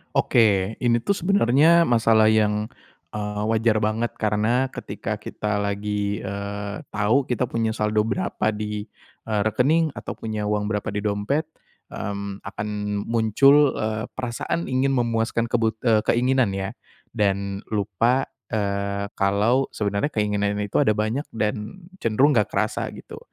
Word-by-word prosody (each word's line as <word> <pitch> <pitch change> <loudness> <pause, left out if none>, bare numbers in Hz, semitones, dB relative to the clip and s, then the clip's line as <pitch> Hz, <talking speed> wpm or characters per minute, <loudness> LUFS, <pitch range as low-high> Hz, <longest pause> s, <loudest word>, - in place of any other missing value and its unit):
Oke, - - +3 0.4
ini 120 -1 +1
tuh - - +1
sebenernya 170 -3 +4
masalah 115 -4 +4
yang, 105 0 +1 0.4
eee, 105 0 -3
wajar 110 -1 +2
banget. 110 +2 -1
Karena 110 +5 +1
ketika - - -5
kita 105 -1 -3
lagi, 100 0 -2
eee, 100 +1 -5
tahu 110 +6 +1
kita 125 0 0
punya 115 -1 0
saldo 105 0 0
berapa 175 -3 -1
di, 105 0 -4 0.4
eee, 105 -2 0
rekening, 150 +9 +2
atau - - -7
punya 110 -2 -4
uang 105 0 -1
berapa 105 -1 -2
di 105 0 -3
dompet, 105 +9 0 0.5
mmm, 100 -1 -5
akan 105 +1 -5 0.4
muncul, 135 +6 +4
eee, 110 0 -2
perasaan 130 +5 -3
ingin 135 +1 +2
memuaskan 115 -1 0
kebut 115 -2 +1
eee, 110 -3 +4
keinginan 125 -4 +2
ya 95 +2 -3 0.4
dan 100 -2 0
lupa, 110 +5 +1 0.2
eee, 100 -1 -2
kalau 105 +7 +2
sebenernya 100 +4 0
keinginan 105 -5 0
itu 100 - 0
ada 110 - +3
banyak 110 +7 -1
dan 105 - -3 0.2
cenderung 125 +6 +3
enggak 105 -7 +3
kerasa, - - 0
gitu. - - -10
110 Hz, 135 wpm, -23 LUFS, 105-120 Hz, 0.5 s, sebenernya